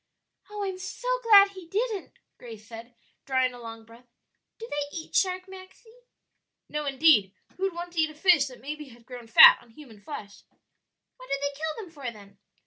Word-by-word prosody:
"Oh, 415 -1 -5
I'm 380 -2 -4
so 385 +6 -7
glad 410 -4 +7
he 375 -3 -12
didn't!" 425 +2 -3 0.3
Grace 225 -3 -11
said, 235 +1 -11 0.3
drawing 260 -1 0
a 245 - -11
long 225 -1 -10
breath. 230 +2 -18 0.5
"Do 455 - -9
they 290 -1 -4
eat 320 - -9
sharks, 370 -1 0
Maxie?" 380 +5 -15 0.7
"No, 300 -1 -4
indeed; 270 - +3 0.2
who'd 385 -1 -2
want 345 0 -7
to 330 - +1
eat 315 - +1
a 310 - -13
fish 320 -3 +4
that 255 -3 -12
maybe 300 +3 -7
had 235 -1 -18
grown 245 -2 -10
fat 225 - +9
on 240 - -21
human 225 -4 -15
flesh?" 205 -7 -9 0.8
"What - - -14
do 275 - 0
they 285 0 -3
kill 315 +1 -4
them 340 - -17
for, 280 -6 -6
then?" 200 -3 -17
295 Hz, 190 wpm, -26 LUFS, 240-370 Hz, 0.8 s, fat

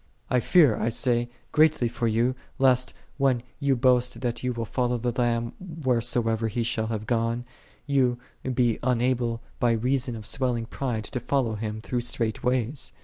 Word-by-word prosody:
39. - - +1
I - - +5
fear, 145 - +5
I 115 - 0
say, 120 0 +1 0.2
greatly 155 -5 +4
for 115 0 -1
thee, 115 +4 +2 0.2
lest, 130 -1 +3 0.2
when 130 -3 +2 0.2
thou 140 -1 +3
boastest 125 0 +2
that 120 -2 -1
thou 125 - -2
wilt 115 -2 -4
follow 125 -1 0
the 120 +1 -1
Lamb 120 -1 0
wheresoever 120 - 0
He 115 +2 -1
shall 110 -1 -1
have 110 -1 -3
gone, 115 +1 0 0.4
thou 130 -4 +2 0.3
lie 125 -3 +1
unable 120 -1 0 0.2
by 120 -1 +3
reason 125 +2 0
of 110 -2 -8
swelling 125 -3 -1
pride 120 -2 -3
to 125 - -4
fol 135 +3 +1
low 115 -2 -2
Him 110 0 -4
through 120 +1 -2
strait 115 -2 -2
ways. 125 +2 -1
120 Hz, 175 wpm, -26 LUFS, 115-130 Hz, 0.4 s, I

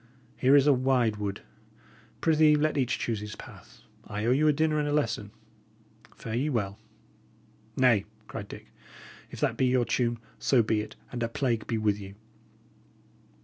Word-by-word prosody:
Here 130 +2 +4
is 140 -1 +6
a 145 - +6
wide 125 -4 +1
wood; 100 -1 -4 0.8
prithee, 155 -1 +5
let 155 +1 +1
each 130 -3 0
choose 115 -3 -2
his 105 0 -7
path; - - -14 0.2
I 105 +1 -4
owe 120 - +3
you 145 +4 +3
a - - +6
dinner 155 +1 +1
and 150 - 0
a - - -1
lesson. 115 -8 -1 0.9
Fare 110 - -7
ye 130 +6 0
well!" 105 -6 -2 1.0
"Nay," 125 -6 +4 0.2
cried - - -7
Dick, - - -12 0.6
"if - - -9
that - - +1
be 130 - +2
your 125 -1 +2
tune, 120 -1 0 0.2
so 125 -4 +3
be 110 0 +1
it, 105 - -9 0.2
and 120 - -5
a 115 - 0
plague 115 -2 -1
be 115 - -1
with 105 -1 +1
you!" 100 0 -10
120 Hz, 175 wpm, -28 LUFS, 110-140 Hz, 1.0 s, is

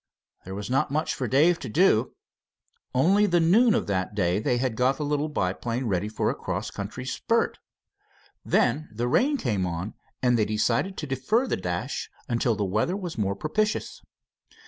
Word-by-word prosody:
There 95 - -6
was 105 +1 -5
not 135 +4 +1
much 155 +3 -1
for 130 - -3
Dave 160 +8 +4
to 130 - -6
do. 130 - +3 0.8
Only 190 +11 +4
the 175 -2 +3
noon 210 +8 +5
of - - 0
that 95 0 -2
day 90 -2 +1
they 120 +3 +1
had 125 -2 -1
got 130 +3 +2
the 150 - -2
little 150 +1 0
biplane 115 +2 -2
ready 100 -1 -1
for 110 - 0
a - - -2
cross - - -4
country - - -6
spurt. - - 0 0.8
Then 155 +1 +1
the 115 +3 -2
rain 275 - +2
came 105 - -1
on, 85 +5 -4 0.3
and 125 -2 +3
they 105 - +3
decided 115 - 0
to 150 - -4
defer 140 - 0
the - - -1
dash 90 +8 -3 0.3
till 115 -2 +2
the 105 - -1
weather 110 - 0
was 175 - -6
more 100 -1 0
propitious. 210 - -2
125 Hz, 180 wpm, -26 LUFS, 105-160 Hz, 0.8 s, noon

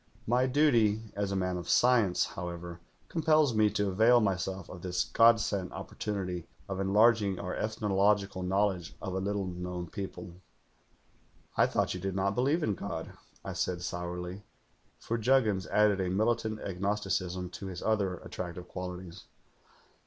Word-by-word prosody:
My 125 +3 +2
duty 120 -7 +3
as 100 -1 -1
a - - -1
man 90 -1 -1
of 90 -1 -6
science, 120 -7 +4
however, 85 -1 -6 0.3
compels 155 -4 +3
me 110 -1 +4
to 105 0 0
avail 110 +6 +5
myself 95 -3 -1
of 90 - -10
this 90 -1 0
god 115 +3 +5
sent 100 -4 -2
opportunity 90 -5 -4 0.2
of 95 -1 -4
enlarging 105 0 +4
our 90 - -4
ethnological 100 -2 +1
knowledge 95 -1 0
of 95 - -5
a 95 - -1
little 100 0 -1
known 90 -1 -5
people.' 95 -2 -7 1.1
"'I - - +4
thought - - 0
you 90 - -5
did 95 +1 -3
not 100 +1 +1
believe 140 - +1
in 105 - +1
God,' 85 -4 -5 0.3
I - - -4
said 90 -1 -2
sourly; 90 +2 -4 0.6
for 115 +1 -3
Juggins 110 -5 +2
added 105 -2 +3
a 90 - -1
militant 110 +2 0
agnosticism 95 -2 -2
to 95 - -7
his 90 -2 -6
other 100 -4 +1
attractive 90 0 -6
qualities. 90 -1 -7
95 Hz, 150 wpm, -30 LUFS, 90-110 Hz, 1.1 s, avail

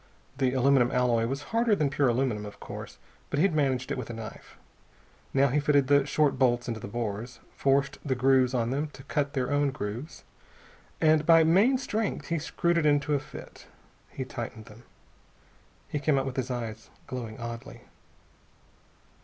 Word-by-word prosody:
The 130 -2 +2
aluminum 130 -1 +4
alloy 120 -2 +2
was 135 +3 -3
harder 230 -2 +3
than 150 -6 0
pure 140 0 +2
aluminum, 120 -3 0
of 105 0 -9
course, - - -8 0.3
but - - -2
he 150 - +3
had 195 - +1
managed 135 -4 0
it - - -2
with 120 - -6
a - - -5
knife. 110 -1 -10 0.7
Now 140 +1 +3
he 145 +4 +2
fitted 145 -1 +3
the 140 +1 +3
short 150 -2 +1
bolts 120 -2 +2
in 120 - -1
the 110 -2 -7
bores, 115 +1 -4 0.2
forced 140 0 +1
the 135 -3 0
threads 130 0 +3
on 120 -1 0
them 145 +3 -1
to 135 - -12
cut 145 0 -1
their 130 0 -1
own 145 0 +2
grooves, 120 +4 -6 0.8
and 155 -1 +4
by 165 0 +6
main 200 +11 +4
strength 220 -8 -3
screwed 170 +2 0
them 155 -2 +2
in 145 -1 +4
to 150 - -2
a 145 - +2
fit. - - -12 0.4
He 130 - -5
tightened 115 -3 -7
them. 115 +2 -15 1.0
He 150 - -3
came 140 0 +2
out 135 - 0
with 130 -2 -4
his 130 0 -2
eyes 115 -3 -5 0.2
glowing 120 -3 -6
oddly. 115 0 -7
135 Hz, 180 wpm, -28 LUFS, 120-145 Hz, 1.0 s, by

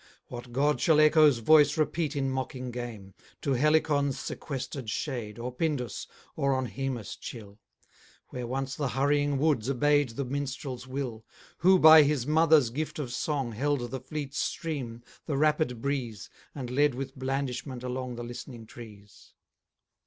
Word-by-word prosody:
What 120 0 -8
god 145 +4 +1
shall 160 -3 +4
echo's 155 -3 +6
voice 150 +5 +5
repeat 155 0 0
In 135 -1 0
mocking 130 -1 -4
game 115 -6 -7 0.3
To 140 - 0
Helicon's 145 0 +2
sequester'd 135 -3 -5
shade, 115 -4 -4
Or 120 +2 -4
Pindus, 130 -3 -2 0.3
or 140 -1 +1
on 130 0 -1
Haemus 130 -4 -4
chill, 105 -3 -10 0.7
Where 125 -1 -5
once 135 +2 -3
the 145 - -1
hurrying 145 +2 +1
woods 140 -5 +1
obey'd 145 -2 +2
The 140 - -2
minstrel's 135 -1 -4
will, 130 -4 -4 0.4
Who, 185 +2 +6
by 160 -2 +9
his 145 -4 +1
mother's 155 -4 +4
gift 155 +5 -4
of 140 -5 -4
song, 135 -2 -1
Held 125 +1 -1
the 130 - -3
fleet 145 0 -6
stream, 130 -10 -3 0.2
the 145 -4 -1
rapid 150 -5 +1
breeze, 130 -7 -3 0.2
And 130 -4 -5
led 145 0 +2
with 135 +1 -5
blandishment 130 -1 -3
along 125 0 -4
The 120 - -6
listening 120 -1 -8
trees? 105 -4 -14
135 Hz, 150 wpm, -28 LUFS, 120-145 Hz, 0.7 s, by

